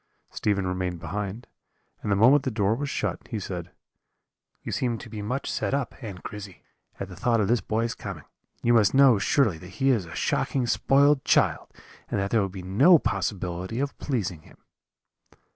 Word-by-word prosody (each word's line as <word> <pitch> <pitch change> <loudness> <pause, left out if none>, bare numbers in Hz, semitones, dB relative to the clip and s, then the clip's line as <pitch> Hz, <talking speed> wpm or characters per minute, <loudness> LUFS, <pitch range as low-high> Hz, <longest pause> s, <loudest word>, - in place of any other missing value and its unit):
Stephen 100 -2 0
remained 90 -1 -2
behind, 100 +7 -5 0.6
and 105 - -2
the - - +4
moment 125 +8 +6
the 135 - -2
door 105 -3 +1
was 140 +4 -3
shut, - - -2
he 110 - -4
said: 90 -3 -6 0.9
"'You - - -5
seem 120 -2 -1
to 115 - -10
be 110 -2 -5
much 125 +7 -3
set - - -1
up, 140 -3 -2
Aunt 100 -6 -8
Grizzy, 105 -3 -9 0.4
at - - -4
the - - -10
thought 120 -2 +1
of 105 - +1
this 120 +1 +2
boy's 115 +2 -1
coming; 95 -8 -7 0.4
you 120 - +4
must 115 +1 +4
know, 135 -6 +6
surely, 105 - +2
that 90 - -11
he 135 0 +3
is 110 -8 +1
a - - -9
shocking 130 -3 0
spoiled 140 +3 +3
child, - - +2 0.4
and - - -1
that 100 0 -2
there 115 - +3
will 100 - -1
be 95 -1 -8
no 130 - +6
possibility 95 - -3
of 140 +1 -2
pleasing 100 - -2
him.' - - -19
105 Hz, 190 wpm, -26 LUFS, 95-125 Hz, 0.9 s, moment